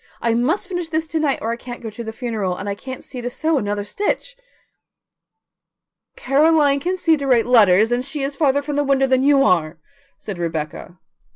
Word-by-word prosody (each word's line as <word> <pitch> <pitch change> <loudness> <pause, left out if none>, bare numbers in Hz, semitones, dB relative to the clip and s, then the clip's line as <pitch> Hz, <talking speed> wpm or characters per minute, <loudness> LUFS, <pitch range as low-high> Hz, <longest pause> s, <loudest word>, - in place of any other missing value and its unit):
I 230 -1 0
must 290 - 0
finish 355 -3 -4
this 320 0 -1
to 325 - -1
night 295 -3 +1
or 225 - -1
I - - -1
can't 245 0 -8
go 225 -2 -7
to 235 +3 -7
the 220 - -5
funeral, 220 -6 -3
and 205 - -6
I 200 - -1
can't 260 +5 -8
see 250 - -8
to 245 - -3
sew 315 +4 0
another 205 -1 -2
stitch." 415 - -3 1.8
"Caroline 285 +1 +3
can 360 +6 -2
see 330 -3 +3
to 280 -1 -4
write 245 -3 +3
letters, 220 -3 +5
and 245 +1 0
she 275 +1 -4
is 275 +1 -3
farther 285 -1 +1
from 290 0 -3
the 290 - +2
window 270 -1 +2
than 260 -1 +2
you 275 0 +4
are," 170 - +1 0.4
said 200 -5 -7
Rebecca. 165 +1 -5
260 Hz, 205 wpm, -20 LUFS, 220-290 Hz, 1.8 s, letters